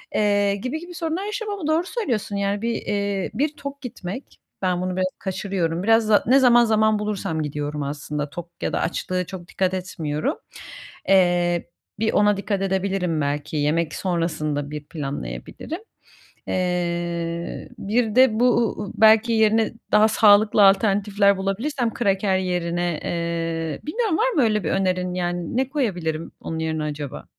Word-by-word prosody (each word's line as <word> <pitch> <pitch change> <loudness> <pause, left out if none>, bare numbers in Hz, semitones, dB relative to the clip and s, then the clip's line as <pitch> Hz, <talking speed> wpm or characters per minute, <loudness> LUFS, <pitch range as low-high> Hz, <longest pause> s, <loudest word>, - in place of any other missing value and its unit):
eee, 205 -1 +2
gibi 255 +9 -4
gibi 350 +2 -10
sorunlar 335 +3 -3
yaşıyorum 420 -1 -4
ama 305 - -3
doğru 315 +2 +2
söylüyorsun. 235 - -2
Yani, 200 +1 -1
bir, 230 0 0
eee, 200 -2 -2
bir 290 +6 0
tok 280 0 -7
gitmek, 235 -1 -7 0.2
ben 180 -1 0
bunu 185 0 -2
biraz 185 - +1
kaçırıyorum. 185 -3 -2
Biraz 225 +1 +4
za 215 -1 +4
ne 260 +3 +6
zaman 240 -2 +6
zaman 215 -1 +3
bulursam 200 -6 -2
gidiyorum 150 0 -3
aslında, 145 +1 -4
tok 170 +3 -8
ya - - -2
da - - 0
açlığa 180 +1 -1
çok 175 -1 -9
dikkat 185 -1 -1
etmiyorum. 175 - -2 0.7
Eee, 175 -2 +3 0.3
bir 220 +1 +1
ona 205 -1 +4
dikkat 200 0 -2
edebilirim 190 -4 0
belki, 145 +2 -2
yemek 155 +2 0
sonrasında 155 -5 -2
bir 150 -1 -6
planlayabilirim. 150 - -6 0.7
Eee, 170 -2 -2
bir 220 +1 0
de 250 -3 +5
bu 250 - +5
u 230 -2 0
u 195 - -7
belki 220 +2 +5
yerine 220 0 +3 0.2
daha 210 +1 +6
sağlıklı 210 -1 +5
alternatifler 200 0 +4
bulabilirsem 230 +6 -2
kraker 195 -3 +1
yerine. 175 -2 -1
Eee, 165 -2 -2
bilmiyorum, 380 +2 -1
var - - +3
mı 320 - +2
öyle 215 -4 +1
bir 155 - -1
önerin? 185 -1 0
Yani 175 +1 -2
ne 260 0 +1
koyabilirim 175 - -2
onun 160 - -5
yerine 160 -1 -2
acaba? 145 -2 -5
195 Hz, 155 wpm, -23 LUFS, 170-220 Hz, 0.7 s, ne